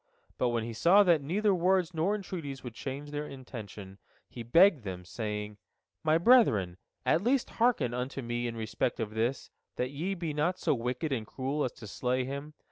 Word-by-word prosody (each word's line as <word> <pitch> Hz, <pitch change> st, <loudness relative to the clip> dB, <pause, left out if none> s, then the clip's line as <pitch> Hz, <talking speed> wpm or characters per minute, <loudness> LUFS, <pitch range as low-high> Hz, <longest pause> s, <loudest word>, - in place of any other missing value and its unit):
But 125 Hz, -, +2 dB
when 120 Hz, -1 st, 0 dB
he 115 Hz, 0 st, -5 dB
saw 180 Hz, -, +6 dB
that 170 Hz, -5 st, +4 dB
neither 200 Hz, +8 st, +1 dB
words 180 Hz, 0 st, +2 dB
nor 170 Hz, +6 st, +1 dB
entreaties 165 Hz, -9 st, -6 dB
would 120 Hz, -3 st, -7 dB
change 140 Hz, +5 st, -6 dB
their 150 Hz, 0 st, -3 dB
intention, 105 Hz, -7 st, -9 dB, 0.3 s
he 120 Hz, -, -9 dB
begged 165 Hz, -, +5 dB
them, 90 Hz, -3 st, -6 dB
saying: 105 Hz, +1 st, -4 dB, 0.5 s
"My 155 Hz, 0 st, +4 dB
brethren, 165 Hz, -, +4 dB, 0.3 s
at 165 Hz, -, +3 dB
least 250 Hz, +4 st, +1 dB
hearken 230 Hz, -, +3 dB
unto 125 Hz, +2 st, -3 dB
me 120 Hz, +1 st, -2 dB
in 115 Hz, -1 st, -5 dB
respect 110 Hz, +2 st, -2 dB
of 110 Hz, -2 st, -2 dB
this, 115 Hz, +4 st, -1 dB, 0.2 s
that 125 Hz, +1 st, -2 dB
ye 170 Hz, +8 st, -2 dB
be 170 Hz, -4 st, -3 dB
not 165 Hz, +5 st, 0 dB
so -, -, +1 dB
wicked 125 Hz, +4 st, -2 dB
and 115 Hz, -5 st, -2 dB
cruel 140 Hz, +3 st, -2 dB
as 125 Hz, -, -2 dB
to -, -, -11 dB
slay 125 Hz, +4 st, -1 dB
him. 140 Hz, +3 st, -6 dB
135 Hz, 190 wpm, -30 LUFS, 115-170 Hz, 0.5 s, saw